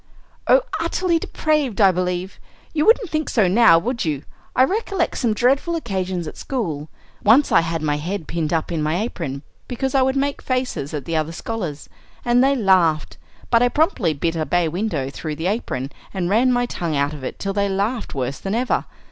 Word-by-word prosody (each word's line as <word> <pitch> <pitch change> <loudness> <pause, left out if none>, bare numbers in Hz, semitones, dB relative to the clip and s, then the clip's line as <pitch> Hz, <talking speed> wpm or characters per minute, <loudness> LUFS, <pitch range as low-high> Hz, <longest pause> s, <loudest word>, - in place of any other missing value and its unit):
"Oh, - - +6 0.2
utterly 335 +1 +1
depraved, 300 -9 -1
I 195 -3 +7
believe. 180 +1 -3 0.3
You 305 +2 +1
wouldn't 450 -4 +4
think 310 -1 -1
so 215 -6 +3
now, 195 -2 +6
would 235 +7 -1
you? 150 -4 -2 0.3
I 255 - +6
recollect 390 - -1
some 230 -4 +1
dreadful 270 +9 +2
occasions 190 - -3
at - - -8
school. 160 - -3 0.3
Once 245 +8 +5
I - - +6
had 165 -1 -3
my 145 -1 +1
head 170 +2 -4
pinned 160 -2 -2
up 165 0 -1
in 165 -2 -1
my 155 +2 0
apron 160 - -4 0.2
because 265 +1 -2
I 270 - +4
would 265 +1 +2
make 280 +1 -1
faces 255 - -2
at 145 - -5
the 165 - -2
other 155 0 0
scholars, 170 -5 -5 0.4
and 240 +1 +4
they 275 +1 +3
laughed; 185 - +2 0.3
but 230 -1 +5
I 245 - +4
promptly 245 - +1
bit 165 +4 -1
a 160 - 0
bay 175 +1 +1
window 160 -6 -2
through 155 +2 -5
the 160 +3 -5
apron, 145 - -2 0.2
and 180 -1 -1
ran 245 +5 +4
my 245 0 +2
tongue 170 -9 -3
out 140 +1 0
of 145 -3 -9
it - - -5
till 195 0 -3
they 200 0 +1
laughed 205 - -2
worse 135 +1 -3
than 195 +2 -3
ever. 250 +2 0
195 Hz, 200 wpm, -21 LUFS, 160-255 Hz, 0.4 s, I